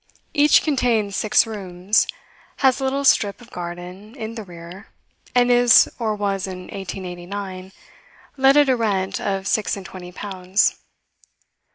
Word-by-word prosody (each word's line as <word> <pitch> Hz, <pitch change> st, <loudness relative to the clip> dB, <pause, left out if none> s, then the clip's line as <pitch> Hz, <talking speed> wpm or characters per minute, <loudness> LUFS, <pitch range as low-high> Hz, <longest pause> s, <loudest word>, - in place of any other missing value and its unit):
Each 295 Hz, +1 st, +5 dB
contains 235 Hz, -9 st, 0 dB
six 215 Hz, -, +3 dB
rooms, 195 Hz, -2 st, 0 dB, 0.6 s
has 260 Hz, 0 st, +4 dB
a -, -, -4 dB
little 275 Hz, +1 st, -1 dB
strip 205 Hz, -6 st, +3 dB
of 240 Hz, 0 st, -16 dB
garden 180 Hz, +5 st, -8 dB
in 225 Hz, -3 st, -6 dB
the 225 Hz, -, -6 dB
rear, 175 Hz, +1 st, -11 dB, 0.5 s
and 245 Hz, 0 st, +4 dB
is, 245 Hz, -1 st, +6 dB
or 220 Hz, -2 st, -1 dB
was 195 Hz, -2 st, -2 dB
in 185 Hz, -1 st, -7 dB
1889, 185 Hz, 0 st, -7 dB, 0.6 s
let 270 Hz, +1 st, +4 dB
at 290 Hz, -1 st, +5 dB
a 260 Hz, -, +3 dB
rent 195 Hz, -5 st, -1 dB
of 195 Hz, -1 st, -2 dB
six 210 Hz, +1 st, 0 dB
and 195 Hz, -, -9 dB
twenty 180 Hz, -1 st, -10 dB
pounds. 195 Hz, -, -1 dB
205 Hz, 145 wpm, -21 LUFS, 185-240 Hz, 0.6 s, is